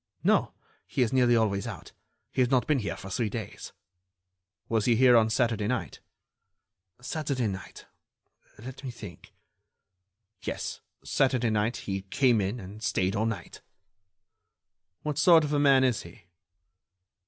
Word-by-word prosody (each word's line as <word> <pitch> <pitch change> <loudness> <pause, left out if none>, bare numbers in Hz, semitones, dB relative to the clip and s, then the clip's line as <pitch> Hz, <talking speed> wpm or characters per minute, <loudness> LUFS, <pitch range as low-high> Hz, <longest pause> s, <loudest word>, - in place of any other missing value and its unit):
"No; - - +3 0.4
he 130 - +1
is 115 - -1
nearly 125 -2 +4
always 100 -4 +1
out. - - -8 0.4
He - - 0
has 125 - +3
not 130 -2 +2
been 150 -3 +2
here 100 -3 -4
for 95 0 -9
three 110 +3 -1
days." 110 -1 -7 1.0
"Was 110 -2 0
he 120 - +4
here 125 +1 +6
on 110 -1 +5
Saturday 110 -3 +1
night?" 125 +1 -3 1.0
"Saturday 140 -1 -2
night?... 100 -2 -6 0.7
Let 130 +5 -10
me 130 - -4
think.... 105 -8 -11 1.1
Yes, - - -5 0.2
Saturday 125 -4 +1
night, 110 +2 0
he 95 -1 -2
came 120 +3 +2
in 100 +6 -2
and 100 +2 -10
stayed 95 -2 0
all 110 +2 +1
night." 115 -2 -6 1.4
"What 150 -1 -2
sort 165 0 +6
of 150 0 -2
a 145 - +2
man 135 -2 +5
is 125 -4 +1
he?" 85 - -14
115 Hz, 145 wpm, -28 LUFS, 105-130 Hz, 1.4 s, here